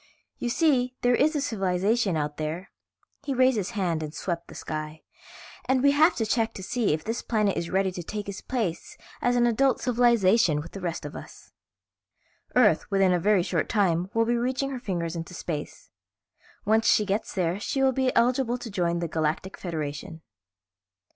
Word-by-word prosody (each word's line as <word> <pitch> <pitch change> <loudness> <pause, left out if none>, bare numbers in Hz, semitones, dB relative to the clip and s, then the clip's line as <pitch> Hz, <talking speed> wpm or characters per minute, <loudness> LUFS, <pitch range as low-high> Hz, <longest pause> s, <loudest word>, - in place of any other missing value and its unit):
You 240 - -2
see, 255 -3 +2
there 245 0 +4
is 305 +5 +3
a 295 - 0
civilization 200 - 0
out 150 -1 -3
there," 160 +5 -4 0.5
he 280 -2 -2
raised 255 0 +4
his 200 -3 -2
hand 170 -5 0
and 155 0 -6
swept 170 -1 -4
the - - -12
sky, 155 0 -6 0.6
"and 260 0 +1
we 280 - +6
have 310 +5 +4
to 225 - -1
check 225 +1 0
to 190 - -7
see 240 +2 0
if 155 +1 -1
this 225 +2 -3
planet 210 -4 0
is 170 - -3
ready 190 0 +1
to 180 - -6
take 205 +4 -6
its 200 0 -6
place 220 -10 -3 0.2
as 245 0 +2
an 240 0 +4
adult 245 +2 +2
civilization 230 - +3
with 165 +3 -8
the 195 - -8
rest 170 -2 -3
of - - -7
us. - - -11 1.0
"Earth, - - +4
within 195 -2 +3
a 175 - +2
very 200 0 +3
short 180 - -1
time, 180 -4 +1
will 230 0 +3
be 240 +1 +1
reaching 260 +3 -1
her 260 - -4
fingers 175 -7 -3
into 170 +2 -6
space. 165 - -6 0.7
Once 220 +2 +3
she 210 - +4
gets 205 +2 -2
there 180 0 0
she 270 +5 -1
will 265 - +4
be 260 0 +1
eligible 245 0 +2
to 240 -2 -8
join 170 -3 0
the 170 - -1
Galactic 160 +4 -2
Federation." 160 -1 -5
200 Hz, 190 wpm, -26 LUFS, 170-245 Hz, 1.0 s, we